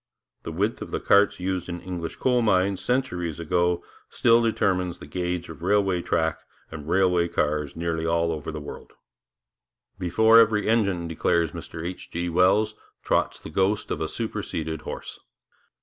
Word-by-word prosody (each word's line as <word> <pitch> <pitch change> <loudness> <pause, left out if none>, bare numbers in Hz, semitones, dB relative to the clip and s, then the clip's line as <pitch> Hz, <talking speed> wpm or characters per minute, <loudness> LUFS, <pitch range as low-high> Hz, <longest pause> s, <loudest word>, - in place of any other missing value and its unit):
The - - -6
width 100 +7 -1
of - - -6
the - - -2
carts 100 -1 +4
used 90 -1 -2
in 85 0 -4
English 85 -2 -5
coal 125 -2 +2
mines 95 -3 +2
centuries 90 - -1
ago 85 +1 +1 0.3
still 115 0 +4
determines 90 -6 0
the - - -11
gauge 90 +3 -3
of 80 -2 -10
railway 95 -1 +2
track 80 -1 0 0.3
and 80 -1 -8
railway 90 -2 +3
cars 75 -3 -1
over - - -11
nearly 85 -1 -1
all 85 -1 0
the 75 +1 -5
world. 75 - -10 1.1
'Before 110 +5 +5
every 110 -2 +3
engine,' 100 -7 +1
declares 80 0 +1
Mr 80 +2 -7
H. 90 +1 -6
G. 85 +1 -3
Wells, 95 +5 +3 0.3
'trots - - +1
the - - -10
ghost 95 +5 0
of - - -2
a - - 0
superseded 80 0 -4
horse.' - - -7
90 Hz, 160 wpm, -25 LUFS, 80-100 Hz, 1.1 s, Before